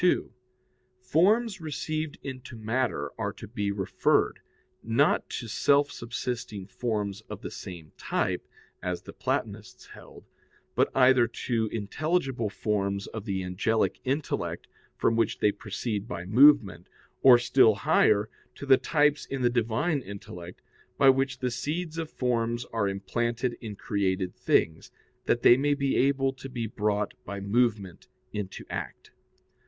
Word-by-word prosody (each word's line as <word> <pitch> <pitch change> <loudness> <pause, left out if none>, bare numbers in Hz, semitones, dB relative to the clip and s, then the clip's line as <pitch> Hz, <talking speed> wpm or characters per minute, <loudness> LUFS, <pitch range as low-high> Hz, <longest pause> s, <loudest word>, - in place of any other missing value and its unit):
2: - - -1 0.7
Forms 195 - +2
received 155 0 -3
into 130 -2 -7
matter 115 +3 -1
are - - -1
to - - -11
be 105 -2 -2
referred, 100 -2 +1 0.4
not 115 +6 +2
to 120 - -5
self 140 +7 +3
subsisting 115 -4 -5
forms 105 -2 -3
of 105 -2 -8
the - - -5
same 90 -8 -9
type, - - -2 0.3
as 90 -1 -3
the - - -10
Platonists - - -4
held, - - -14 0.5
but - - +2
either 125 -2 +5
to 115 -1 -2
intelligible 130 - -1
forms 100 -1 -1
of 110 -2 -7
the 95 -3 -2
angelic 100 +5 0
intellect, 140 +3 -2 0.3
from 115 - +2
which 115 - +1
they 105 - +3
proceed 105 0 -4
by 90 -2 -5
movement, 110 - +5 0.3
or, 130 -2 +9
still 120 -2 +4
higher, 105 +1 +3 0.3
to - - -8
the 135 -1 +6
types 150 0 +1
in 135 -2 -3
the 120 - +3
Divine 120 +7 0
intellect, 90 -6 -10 0.3
by 135 -1 +7
which 135 0 -1
the 125 -1 -2
seeds 160 +6 -3
of 160 -1 -4
forms 120 -2 -1
are 105 -3 +1
implanted 120 +5 -2
in 110 -3 -6
created 95 -3 -1
things, 80 0 +1 0.4
that 120 - +1
they 120 - +8
may 145 +1 +2
be 140 -1 0
able 135 0 +2
to 135 +1 -9
be 120 -3 -3
brought 105 -1 -1
by 100 0 -6
movement 105 -2 0 0.3
into 105 -2 -5
act. - - -6
115 Hz, 140 wpm, -28 LUFS, 100-135 Hz, 0.7 s, or